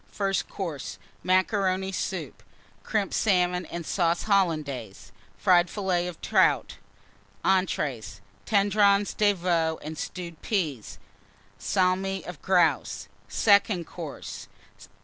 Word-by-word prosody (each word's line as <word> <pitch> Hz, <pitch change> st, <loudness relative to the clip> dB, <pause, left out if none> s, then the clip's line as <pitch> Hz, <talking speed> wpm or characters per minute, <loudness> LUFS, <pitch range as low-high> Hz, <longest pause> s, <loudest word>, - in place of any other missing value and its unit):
FIRST 195 Hz, -1 st, -1 dB
COURSE. 165 Hz, -9 st, -5 dB, 0.2 s
Macaroni 190 Hz, 0 st, +1 dB
Soup. 195 Hz, -, -4 dB, 0.4 s
Crimped 210 Hz, -3 st, -1 dB
Salmon 180 Hz, -3 st, +1 dB
and 170 Hz, -1 st, -6 dB
Sauce 170 Hz, -1 st, +1 dB
Hollandaise. 155 Hz, -, -1 dB, 0.3 s
Fried 175 Hz, -1 st, +4 dB
Fillets 180 Hz, -3 st, -1 dB
of 170 Hz, -, -10 dB
Trout. -, -, +2 dB, 0.7 s
ENTREES. 135 Hz, -, 0 dB, 0.3 s
Tendrons 200 Hz, -1 st, +3 dB
de 205 Hz, -1 st, +3 dB
Veau 170 Hz, -3 st, 0 dB
and 155 Hz, +1 st, -6 dB
Stewed 170 Hz, -3 st, -6 dB
Peas. 155 Hz, -, -2 dB, 0.6 s
Salmi 190 Hz, +1 st, 0 dB
of 175 Hz, -5 st, -8 dB
Grouse. 165 Hz, -, +1 dB, 0.2 s
SECOND 200 Hz, -4 st, +3 dB
COURSE. -, -, -8 dB
180 Hz, 100 wpm, -26 LUFS, 165-195 Hz, 0.7 s, Fried